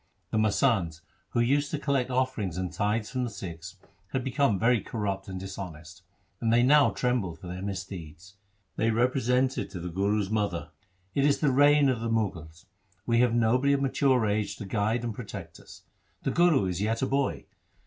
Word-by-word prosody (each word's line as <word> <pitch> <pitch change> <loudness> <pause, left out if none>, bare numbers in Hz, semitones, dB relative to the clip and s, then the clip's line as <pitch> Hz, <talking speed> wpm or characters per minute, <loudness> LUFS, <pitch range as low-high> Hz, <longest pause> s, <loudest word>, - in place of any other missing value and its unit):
The 110 - +1
masands, 100 - +1 0.3
who - - -1
used 140 +4 +2
to 150 - -2
collect 140 -3 0
offerings 125 -9 -1
and 90 -1 -3
tithes 105 +3 -1
from 130 -1 -1
the 120 - -2
Sikhs, 90 -2 -8 0.4
had 130 -1 0
become 130 -4 +1
very 115 +1 +3
corrupt 100 -3 -3
and 95 -1 -5
dishonest, 85 -4 -8 0.4
and 115 - 0
they 120 +1 +4
now 145 +2 +6
trembled 120 -10 -1
for 85 - -13
their 90 +1 -6
misdeeds. 95 -2 -7 0.4
They 115 - +2
represented 125 +2 +1
to 90 - -7
the 90 +1 -5
Guru's 100 +3 0
mother, 105 -6 -1 0.2
' 95 0 -41
It 140 - +1
is 145 0 +3
the 145 -3 +2
reign 145 +2 +5
of 130 -3 +1
the 115 0 -3
Mughals. 90 -7 -3 0.4
We 115 -1 +2
have 120 -1 +3
nobody 125 +5 +3
of 140 - +1
mature 130 -3 +2
age 105 0 -1
to 105 - -7
guide 110 +4 0
and 115 -2 -2
protect 100 -7 -8
us. - - -15 0.4
The - - 0
Guru 170 - +4
is 90 0 -2
yet 115 +4 0
a - - +3
boy. 135 0 -1
110 Hz, 190 wpm, -28 LUFS, 95-130 Hz, 0.4 s, now